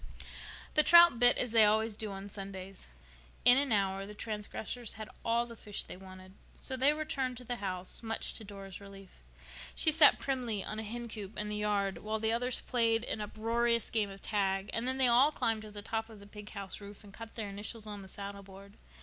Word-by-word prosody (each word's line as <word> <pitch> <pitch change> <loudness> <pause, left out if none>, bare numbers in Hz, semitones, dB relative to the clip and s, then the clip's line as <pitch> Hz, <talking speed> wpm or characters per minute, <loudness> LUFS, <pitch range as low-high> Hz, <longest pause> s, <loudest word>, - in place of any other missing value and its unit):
The 305 - +7
trout 340 -5 +7
bit 245 0 +6
as 250 - 0
they 225 -1 +7
always 220 +1 +3
do 215 0 -5
on 195 +1 -7
Sundays. 195 - -9 0.5
In 245 +2 +8
an 280 -3 0
hour 195 -2 +1
the 210 - -10
transgressors 220 +2 -4
had 215 0 -8
all 235 +1 +2
the 235 -1 -10
fish 210 -2 -4
they - - -9
wanted, 185 0 -12 0.2
so 260 - -1
they 265 +3 +4
returned 275 -5 -2
to 250 - -9
the 245 0 -4
house, 185 -3 -4
much 225 -1 -2
to - - -6
Dora's 195 -2 -9
relief. 195 - -13 0.5
She 315 - +5
sat 305 -1 +7
primly 245 -7 -2
on 215 - -5
a - - -4
hencoop 220 -2 -6
in 210 0 -3
the 210 - -2
yard 200 -3 0
while 215 +4 -2
the 220 +1 0
others 245 +2 -1
played 230 -2 +1
an 220 - -3
uproarious 230 +2 0
game 215 -3 0
of 195 0 -11
tag; 195 -2 0
and 230 +2 -1
then 260 0 0
they 265 - +5
all 250 +5 +6
climbed 225 -6 -1
to 215 - -9
the 205 -1 -9
top 225 +1 -3
of 220 -2 -12
the 200 - -13
pig 210 0 -10
house 200 -1 -7
roof 200 +1 -11
and 200 -1 -14
cut 230 +1 -10
their 215 -3 -3
initials 210 +2 -6
on 205 -1 -7
the 190 - -11
saddleboard. 200 0 -9
215 Hz, 215 wpm, -32 LUFS, 200-235 Hz, 0.5 s, In